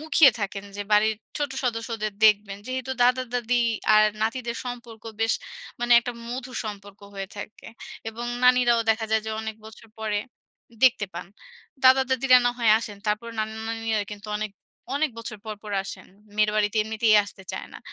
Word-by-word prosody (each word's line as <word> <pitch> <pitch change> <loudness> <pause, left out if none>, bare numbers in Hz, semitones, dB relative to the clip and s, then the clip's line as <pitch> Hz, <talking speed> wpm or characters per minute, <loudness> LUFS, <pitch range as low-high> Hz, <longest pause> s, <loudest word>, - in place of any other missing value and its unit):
মুখিয়ে 310 -2 +6
থাকেন 200 0 -3
যে 205 - -3
বাড়ির 215 +1 +4 0.2
ছোট 290 -1 -1
সদস্যদের 230 -3 -2
দেখবেন। 205 -2 +4
যেহেতু 260 0 -4
দাদা-দাদী 245 -1 +2 0.3
আর 215 0 +7 0.2
নাতিদের 235 +1 -2
সম্পর্ক 240 -3 -8 0.2
বেশ 225 0 +3 0.5
মানে 240 0 +2
একটা 245 +1 -5 0.2
মধুর 255 0 -5
সম্পর্ক 205 -2 -8
হয়ে 195 -1 -5
থাকে। 205 +1 -9 0.4
এবং 235 +2 -6 0.2
নানীরাও 250 -2 +5
দেখা 220 0 0
যায় 220 0 +2
যে 220 - -2
অনেক 220 0 -5
বছর 220 +1 -13
পরে 215 -2 -1 0.6
দেখতে 250 -6 +5
পান। 170 +1 -6 0.6
দাদা-দাদীরা 260 0 +6
না - - +4
হয় 230 -2 +4
আসেন। 210 -3 -7
তারপর 210 +3 -1
নানা-নানীরা 220 0 -2
কিন্তু 205 +1 -10
অনেক, 215 0 -3 0.4
অনেক 300 +1 +1
বছর 225 -1 -6
পর, 215 -1 -4
পর 210 - -7
আসেন। - - -8 0.3
মেয়ের 210 0 +3
বাড়িতে 210 +1 +1
এমনিতেই 220 0 +3
আসতে 200 -1 -12
চায় - - -5
না। - - -9
225 Hz, 160 wpm, -25 LUFS, 215-245 Hz, 0.6 s, আর